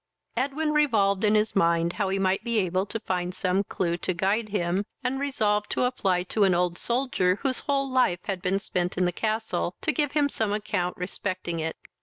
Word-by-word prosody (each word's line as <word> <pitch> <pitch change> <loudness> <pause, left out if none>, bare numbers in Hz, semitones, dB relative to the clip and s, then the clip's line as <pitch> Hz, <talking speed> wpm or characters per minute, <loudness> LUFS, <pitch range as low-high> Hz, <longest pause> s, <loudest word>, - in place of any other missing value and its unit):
Edwin 285 +5 0
revolved 215 -10 +3
in 210 0 +4
his 215 +1 +1
mind 170 -2 +2
how 200 -2 -1
he 195 - 0
might 190 +1 +1
be 235 -1 0
able 185 0 +1
to 225 - -3
find 180 -2 -2
some 185 +1 +1
clue 170 -3 -1
to 180 0 -2
guide 205 +5 0
him, 185 -1 0 0.2
and 260 +2 -1
resolved 210 -7 0
to - - +1
apply 195 -8 +1
to 205 +3 0
an 190 -2 +4
old 175 0 0
soldier, 235 -7 +1
whose 265 -2 0
whole 275 -1 0
life 255 -9 +2
had 195 -3 -3
been 195 +1 +1
spent 180 -3 -2
in 180 - +3
the 175 - +1
castle, 215 -3 -2
to - - +1
give 295 -3 0
him 295 -1 +3
some 220 -7 -1
account 205 -4 -2
respecting 180 -2 -3
it. 160 0 -3
200 Hz, 205 wpm, -26 LUFS, 180-235 Hz, 0.2 s, in